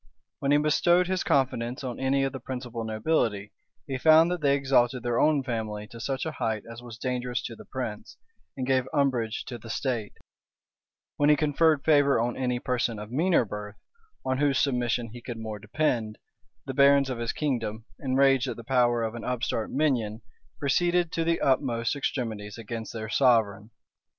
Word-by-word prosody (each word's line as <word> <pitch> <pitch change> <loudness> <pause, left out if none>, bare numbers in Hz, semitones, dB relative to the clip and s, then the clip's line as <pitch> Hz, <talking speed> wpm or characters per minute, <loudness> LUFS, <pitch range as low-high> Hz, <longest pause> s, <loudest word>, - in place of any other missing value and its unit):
When 140 - -1
he 145 - +6
bestowed 175 +4 +3
his 185 0 -1
confidence 130 -2 0
on 125 -2 -5
any 135 +1 +1
of 135 - -1
the 135 - -5
principal 125 -2 -5
nobility, 110 -2 -1 0.3
he 135 -1 -4
found 160 +3 +6
that 180 -2 -2
they 140 -1 +3
exalted 130 -3 +2
their 120 -1 0
own 150 -3 +3
family 110 -4 -4
to 115 - -11
such 135 +4 -2
a 160 - -2
height 110 -7 -2
as 115 0 -9
was 120 -2 -10
dangerous 125 -1 -2
to 115 - -6
the - - -13
prince, 115 -5 -6 0.4
and 130 - -2
gave 130 -1 +1
umbrage 125 -6 0
to 120 -2 -7
the 115 - -11
state: 115 -3 -2 1.0
when 145 0 +3
he 150 - +7
conferred 150 0 +2
favor 145 -4 +4
on 120 +1 -1
any 125 -2 -1
person 120 -2 -1
of 105 +1 -8
meaner 160 0 +2
birth, 105 0 -7 0.5
on 130 0 0
whose 140 -2 +2
submission 120 -4 0
he 120 - -9
could 120 -1 -6
more 110 -2 -6
depend, 110 -1 -1 0.5
the 135 - -4
barons 140 0 +5
of 120 - -4
his 115 -1 -1
kingdom, 115 -7 -2
enraged 135 0 +3
at - - -4
the 115 - -8
power 120 -1 +2
of 110 0 -2
an 120 - -7
upstart 125 -3 -2
minion, 120 -7 0 0.3
proceeded 175 +4 +1
to 165 - -1
the 165 0 +1
utmost 130 -2 +1
extremities 115 -7 -3
against 115 0 -6
their 110 -1 -5
sovereign. 110 -4 +2
125 Hz, 180 wpm, -27 LUFS, 115-140 Hz, 1.0 s, he